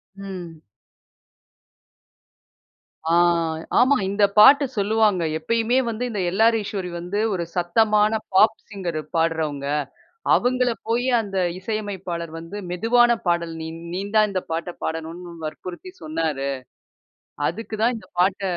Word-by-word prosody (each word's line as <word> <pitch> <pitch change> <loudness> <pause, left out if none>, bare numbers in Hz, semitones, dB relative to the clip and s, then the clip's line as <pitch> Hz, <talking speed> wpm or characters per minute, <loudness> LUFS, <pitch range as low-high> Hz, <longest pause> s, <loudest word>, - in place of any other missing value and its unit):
ம். 180 -5 -8 2.5
ஆ. - - +3 0.7
ஆமா. 270 +3 +5
இந்த 200 +1 +1 0.2
பாட்டு 280 +6 +8
சொல்லுவாங்க. 205 -3 +2
எப்பயுமே 230 +7 +1
வந்து 230 +2 -3
இந்த 210 -3 -3
எல்ஆர் 225 +3 +4
ஈஸ்வரி 195 -3 -4
வந்து 180 +4 -3
ஒரு 175 -2 -1
சத்தமான 210 +4 +3
பாப் 215 +3 +5
சிங்கர் 180 -6 -4 0.2
பாடுறவங்க. 160 -4 0 0.7
அவங்கள 250 0 +2 0.2
போயி 240 +3 +1
அந்த 195 -3 -4 0.2
இசையமைப்பாளர் 185 -5 -4
வந்து, 165 +5 -8
மெதுவான 240 +6 +4 0.2
பாடல் 170 -1 0
நீ 160 - -5 0.3
நீந்தான் 205 +3 +2
இந்த 185 -1 -1
பாட்டைப் 170 +2 -4
பாடணும்னு 165 +2 -5
வற்புறுத்தி 180 - -7
சொன்னாரு. 155 -3 -2 1.0
அதுக்கு 215 +4 -5
தான் 240 +2 +3
இந்த 220 - -12
பாட்ட 190 +2 +2
195 Hz, 115 wpm, -23 LUFS, 170-220 Hz, 2.5 s, பாட்டு